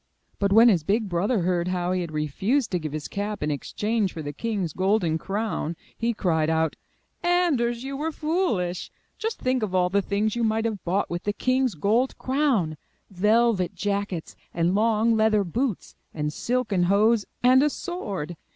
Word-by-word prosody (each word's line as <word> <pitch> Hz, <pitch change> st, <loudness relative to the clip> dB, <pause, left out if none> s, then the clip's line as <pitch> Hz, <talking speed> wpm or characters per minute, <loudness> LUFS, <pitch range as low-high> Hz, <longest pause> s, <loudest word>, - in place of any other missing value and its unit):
But 200 Hz, -1 st, +1 dB
when 225 Hz, +4 st, +7 dB
his 185 Hz, -9 st, +4 dB
big 210 Hz, +5 st, +1 dB
brother 190 Hz, +5 st, 0 dB
heard 175 Hz, 0 st, 0 dB
how 180 Hz, -1 st, -1 dB
he 185 Hz, 0 st, 0 dB
had 170 Hz, -2 st, -5 dB
refused 190 Hz, -, 0 dB
to 180 Hz, -, 0 dB
give 155 Hz, -2 st, -5 dB
his 155 Hz, 0 st, -4 dB
cap 205 Hz, -2 st, -4 dB
in 150 Hz, -, 0 dB
exchange 210 Hz, -, -1 dB
for 160 Hz, -, -6 dB
the 145 Hz, 0 st, -5 dB
king^s 200 Hz, -4 st, -3 dB
golden 185 Hz, -4 st, +1 dB
crown, 195 Hz, -4 st, -2 dB, 0.2 s
he 235 Hz, +1 st, 0 dB
cried 160 Hz, -8 st, 0 dB
out: 160 Hz, -1 st, +1 dB, 0.5 s
''Anders, 280 Hz, -10 st, +1 dB
you 275 Hz, +1 st, -4 dB
were 310 Hz, +4 st, -2 dB
foolish! 300 Hz, -, -1 dB, 0.3 s
Just 445 Hz, 0 st, -2 dB
think 255 Hz, -1 st, 0 dB
of 200 Hz, -4 st, -2 dB
all 180 Hz, -1 st, +2 dB
the 200 Hz, +1 st, +3 dB
things 205 Hz, +3 st, -1 dB
you 235 Hz, -, -1 dB
might 220 Hz, 0 st, +1 dB
have 220 Hz, -4 st, -3 dB
bought 185 Hz, +2 st, -1 dB
with 175 Hz, 0 st, -2 dB
the 205 Hz, -, 0 dB
king's 255 Hz, -2 st, +1 dB
gold 225 Hz, -, +1 dB
crown! 255 Hz, -, 0 dB, 0.3 s
Velvet 210 Hz, 0 st, +2 dB
jackets 200 Hz, -4 st, -3 dB, 0.2 s
and 170 Hz, +1 st, +2 dB
long 225 Hz, +2 st, +3 dB
leather 220 Hz, -1 st, +3 dB
boots 225 Hz, +4 st, -2 dB, 0.2 s
and 150 Hz, -1 st, -2 dB
silken 225 Hz, -7 st, 0 dB
hose, 215 Hz, +2 st, +3 dB, 0.2 s
and 255 Hz, +1 st, +6 dB
a 300 Hz, -, +3 dB
sword. 200 Hz, -, -5 dB
205 Hz, 180 wpm, -25 LUFS, 175-235 Hz, 0.5 s, when